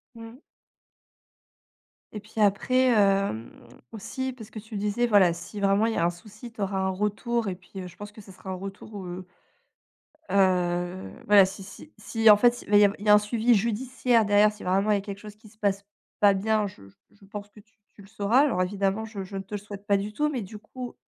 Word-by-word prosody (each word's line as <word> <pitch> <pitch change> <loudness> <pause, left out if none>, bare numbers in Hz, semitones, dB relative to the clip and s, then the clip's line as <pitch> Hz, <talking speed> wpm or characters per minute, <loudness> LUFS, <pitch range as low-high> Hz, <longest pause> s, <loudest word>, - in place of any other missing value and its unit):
Mmh. 230 +1 -11 1.7
Et 210 - -6
puis 215 +2 -8
après, 255 +6 +3
hem, 195 - +2 0.4
aussi 260 +5 -5
parce 225 -4 -12
que 220 - -8
tu 220 +1 -9
disais, 210 +4 0
voilà, 200 -6 +5
si 175 +5 -8
vraiment 200 +2 +3
il 230 - 0
y - - -4
a 170 - +1
un 170 - +2
souci, 210 +7 -12
tu 225 - -13
auras 195 0 -1
un 190 0 0
retour 210 +4 -1
et 185 - -2
puis 185 +1 -10
je 175 - -13
pense 205 0 -9
que 215 - -13
ce 195 - -14
sera 190 - -13
un - - -3
retour, 195 +1 -8
heu 180 +1 -7 1.0
heu, 180 -1 +1 0.2
voilà 205 -2 +7
si 190 +1 -6
si 250 +10 -13
si 225 +1 +3
en 210 - +9
fait, 240 +2 +3
il - - -13
va 205 - +5
y 205 - +7
av 200 0 +2
il 205 - -9
y - - 0
a - - +9
un - - +8
suivi 225 +3 +1
judiciaire 235 +2 +1
derrière, 205 +1 +4
si 210 - -12
vraiment 195 +3 +1
il - - +4
y - - +3
a - - -4
quelque 200 -1 -7
chose 210 0 -11
qui 215 0 -17
se 215 - -25
passe 200 -2 -1 0.4
pas 205 -1 +6
bien, 210 +2 0
je 100 - -12
je - - -21 0.2
je - - -26
je 195 - -18
pense 205 +1 -8
que 210 - -16
tu 220 +1 -27 0.2
tu - - -16
le 195 - -14
sauras. 210 +3 +1
Alors 265 -11 +2
évidemment, 195 +3 -1
je 210 -3 -7
je 195 +1 -8
ne 195 - -4
te 195 +2 -10
le - - -1
souhaite 205 0 -10
pas 200 -2 +3
du 205 +2 -5
tout, 300 +6 0
mais 265 -5 -3
du 210 +1 -9
coup, 245 +3 -9
205 Hz, 245 wpm, -26 LUFS, 195-220 Hz, 1.7 s, en